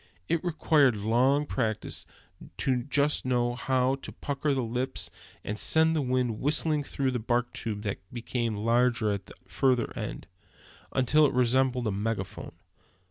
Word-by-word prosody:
It 170 0 0
requires 155 -6 +3
long 130 +6 +3
practice 110 -7 -2 0.5
to 130 - +1
know 120 - -3
just 145 +1 +2
how 125 +1 +1
to - - -7
pucker 145 +1 -3
up 140 - +2
the 130 - 0
lips, 125 +3 -3 0.3
and 105 +1 -4
send 160 0 +3
the 155 - +1
wind 125 -4 0
whistling 150 +1 +1
through 135 -1 -1
the 125 - -2
bark 120 +2 0
tube 105 -2 -4
that 100 -2 -3
becomes 120 -2 -2
larger 115 0 +2
at 100 -2 -4
the - - -13
further 120 +5 +1
end, - - -5 0.7
until 150 +4 +4
it - - -3
resembles 125 0 +2
a 110 - +1
megaphone. 100 -1 -4
125 Hz, 155 wpm, -28 LUFS, 115-135 Hz, 0.7 s, until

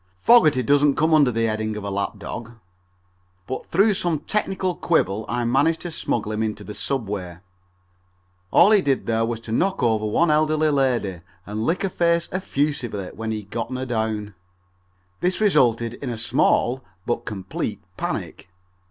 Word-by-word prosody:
Fogerty 155 - +5
doesn't 145 +2 +3
come 160 +1 +2
under 145 -4 +5
the 115 -1 -1
heading 110 -1 -2
of 105 - -6
a 100 - -4
lap 100 +2 -2
dog, 115 +3 -7 0.9
but 130 - -5
through 200 +5 +3
some 175 -4 0
technical 190 +1 -1
quibble 110 - 0
I 120 0 -1
managed 145 +7 +2
to 175 - -5
smuggle 115 -8 -2
him 110 0 -2
into 105 -1 -3
the 105 - -8
subway. 100 -7 -3 1.1
All 185 - +6
he 210 -2 +6
did 140 -4 0
there 115 0 +1
was 115 -1 -3
to 115 - -8
knock 190 +6 0
over 110 -2 +2
one 160 +10 +2
elderly 155 0 +2
lady 125 - 0 0.2
and 105 +2 -3
lick 175 +4 0
her 195 - +1
face 170 -1 +1
effusively 140 - -2
when 110 0 -5
he 110 -1 -2
had 100 - -20
gotten 120 +3 -3
her 130 +1 -3
down. 110 -3 -2 0.9
This 180 +1 0
resulted 120 - +3
in 130 +1 -6
a 120 - -4
small 125 +1 +1 0.2
but 120 - -1
complete 95 -4 -4
panic. - - -5
120 Hz, 170 wpm, -23 LUFS, 110-155 Hz, 1.1 s, All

